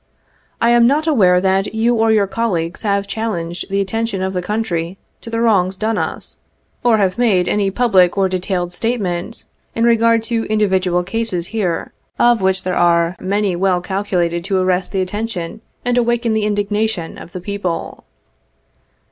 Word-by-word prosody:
I 235 - +3
am 240 0 +5
not 295 +4 +2
aware 190 - +4
that 190 +3 0
you 230 +2 +2
or 225 -1 +2
your 210 -2 +3
colleagues 190 -5 -2
have 200 -2 0
chal 220 +2 -3
lenged 170 +1 -5
the 195 +1 0
attention 200 0 -2
of 190 0 -2
the 180 - -1
country 180 -3 -2 0.2
to - - -9
the 230 0 -2
wrongs 190 -5 +2
done 220 +1 -1
us, - - -5 0.4
or 240 -2 +4
have 195 +1 0
made 195 -7 +3
any 205 -2 +1
public 195 -5 +3
or 195 -1 +3
detailed 180 -1 -2
statement 205 -1 -3 0.3
in 230 - 0
regard 230 -1 +3
to 230 -1 -1
individual 190 -4 +1
cases 190 -3 -2
here, 185 -7 -2 0.2
of 240 -3 +4
which 190 0 +1
there 185 - -1
are 170 0 +3
many 200 0 0
well 185 0 +1
calculated 175 -3 -1
to 195 -1 0
arrest 185 0 0
the 190 - 0
attention 205 0 -4 0.2
and 245 0 +2
awaken 235 -1 +1
the 215 -1 0
indignation 205 -3 -1
of - - -11
the 180 - -6
people. 185 -2 -4
200 Hz, 170 wpm, -18 LUFS, 180-225 Hz, 0.4 s, am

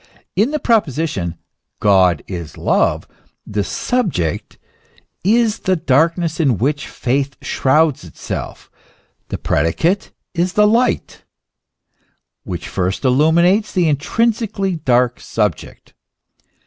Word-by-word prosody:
In 210 +7 +3
the 305 - -1
proposition 155 - 0 0.2
" - - -56
God 95 -6 +3
is 85 -5 -7
love," - - +1 0.4
the 105 -1 -2
subject 170 - -2 0.7
is 225 +2 +2
the 190 - +1
darkness 165 +2 +1
in 135 -9 +2
which 140 +6 -1
faith 135 +1 -2
shrouds 150 - +2
itself; 85 - -7 0.6
the - - -4
predicate 85 - 0 0.2
is 180 +1 0
the 210 - +4
light, 235 +4 0 1.2
which 90 -2 -6
first 95 +4 -2
illu 140 +5 +3
minates 180 +6 +3
the 180 -4 +2
intrinsically 195 - 0
dark 125 -4 +1
subject. 105 -7 -3
155 Hz, 110 wpm, -18 LUFS, -, 1.2 s, the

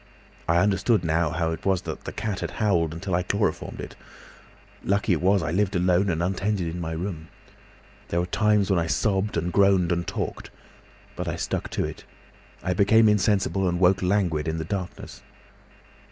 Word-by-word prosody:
I 85 - +3
understood 100 +2 +2
now 80 0 +1
how 80 0 -1
it 80 - -5
was 95 -2 +1
the - - -4
cat 105 -3 -5
had - - -3
howled 85 -7 +1
until 85 +3 -5
I 90 - +2
chloroformed 100 -1 -2
it. - - -7 0.9
Lucky 100 -1 +1
it 80 - -1
was 95 0 +3
I 80 - -2
lived 95 +2 0
alone 90 +2 +2
and 85 -1 0
untended 95 0 -1
in 90 - -5
my 80 -1 -3
room. 80 -1 -5 0.8
There 85 - -1
were 90 - 0
times 105 +1 +2
when 95 - +3
I 85 - -1
sobbed 100 +1 0
and 85 +1 -2
groaned 95 -3 +4
and 85 0 -1
talked. - - -4 0.7
But - - -4
I - - -2
stuck - - -3
to - - -1
it.... - - -7 0.6
I 90 - 0
became 110 +4 +5
insensible 95 -2 +2
and 85 0 -1
woke 90 +1 +4
languid 90 -5 +1
in 80 0 -1
the 80 - -3
darkness. 95 0 -6
90 Hz, 180 wpm, -25 LUFS, 85-100 Hz, 0.9 s, became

